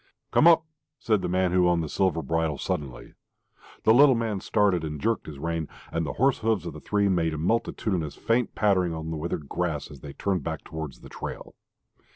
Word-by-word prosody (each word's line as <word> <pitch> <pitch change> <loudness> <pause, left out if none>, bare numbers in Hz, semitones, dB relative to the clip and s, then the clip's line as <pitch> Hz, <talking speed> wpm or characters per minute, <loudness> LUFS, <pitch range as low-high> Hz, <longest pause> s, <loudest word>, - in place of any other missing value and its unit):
"Come 165 - +5
up!" 165 -1 +6 0.3
said 110 -6 +1
the - - -2
man 90 0 +1
who 90 -1 +4
owned 85 -1 +2
the - - -3
silver 85 0 0
bridle, 80 -3 0
suddenly. 65 -4 -4 0.7
The 110 - +6
little 135 +1 +7
man 115 -4 -1
started 100 -4 +1
and 75 -1 -4
jerked 115 +10 -1
his 75 -2 -8
rein, 80 +1 -2 0.2
and 80 -1 -1
the - - -3
horse 135 +4 +2
hoofs 110 -4 0
of 85 - -5
the 75 - -9
three 100 +5 +1
made 85 -4 +1
a - - -4
multitudinous 90 -3 -1
faint 115 +1 0
pattering 95 -5 +2
upon 80 0 -5
the 80 - -3
withered 75 -2 -4
grass 80 -4 -2
as - - -11
they 70 -2 -9
turned 95 +1 -1
back - - -4
towards 80 -4 -7
the - - -12
trail.... - - -7
90 Hz, 205 wpm, -26 LUFS, 80-105 Hz, 0.7 s, little